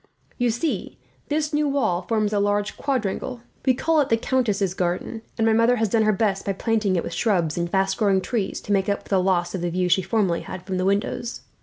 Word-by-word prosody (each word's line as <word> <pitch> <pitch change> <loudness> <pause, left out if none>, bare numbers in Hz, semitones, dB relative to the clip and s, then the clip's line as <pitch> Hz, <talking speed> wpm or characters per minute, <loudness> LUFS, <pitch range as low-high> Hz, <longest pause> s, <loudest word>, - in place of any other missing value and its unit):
"You 245 0 +2
see, 240 +8 -2 0.3
this 300 0 0
new 295 0 +2
wall 220 -11 +1
forms 215 +2 0
a 205 - +2
large 205 0 0
quadrangle. 250 -2 -2 0.3
We 255 - +5
call 320 +3 +2
it 275 - -1
the 225 - +4
countess's 215 -7 0
garden, 180 +5 -2 0.2
and 225 - +2
my 225 - +4
mother 230 +2 +4
has 225 -3 0
done 225 +2 +2
her 215 0 +4
best, 200 -2 0
by 195 - -1
planting 215 -1 0
it 170 - 0
with - - -5
shrubs 175 -9 +1
and 170 0 -1
fast 195 +1 +1
growing 200 -3 +3
trees, 200 0 -2
to - - -6
make 195 0 +1
up 200 - -1
for - - -18
the 190 -2 +3
loss 180 -2 +1
of 185 - -3
the 175 - -1
view 180 +1 0
she 190 - +4
formerly 190 -2 0
had 185 -1 -8
from 190 -1 -2
the 185 - 0
windows. 205 +4 -1
205 Hz, 235 wpm, -23 LUFS, 190-230 Hz, 0.3 s, We